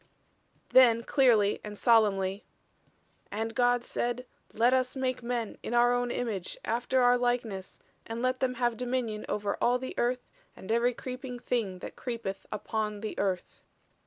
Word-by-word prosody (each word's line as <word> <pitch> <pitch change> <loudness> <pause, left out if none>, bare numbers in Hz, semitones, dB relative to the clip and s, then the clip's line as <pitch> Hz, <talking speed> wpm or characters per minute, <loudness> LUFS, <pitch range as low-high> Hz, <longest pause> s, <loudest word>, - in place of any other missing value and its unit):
Then 235 -3 +6
clearly 230 -7 +3
and 210 -1 -7
solemnly: 200 -4 +3 0.9
"And 225 +2 -3
God 245 0 +3
said: 245 +1 -2 0.3
let 235 +4 +3
us 255 0 +1
make 255 -1 -1
men 235 -2 -3
in 240 - -3
our 240 0 +5 0.2
image, 220 -7 -3
after 245 +3 +1
our 245 0 +5
likeness, 235 -6 -2 0.3
and 225 +1 -4
let 255 +1 0
them 255 -1 0
have 240 -2 0
dominion 240 -3 -2
over 205 -1 -2
all 245 +1 +4
the 260 +1 -6
earth, 245 +1 0 0.3
and 190 - -7
every 235 +1 +2
creeping 255 0 -6
thing 230 -6 -2
that - - -7
creepeth 230 -6 -5
upon 210 -2 -3
the 215 - -4
earth." 190 -3 -2
240 Hz, 150 wpm, -29 LUFS, 215-250 Hz, 0.9 s, Then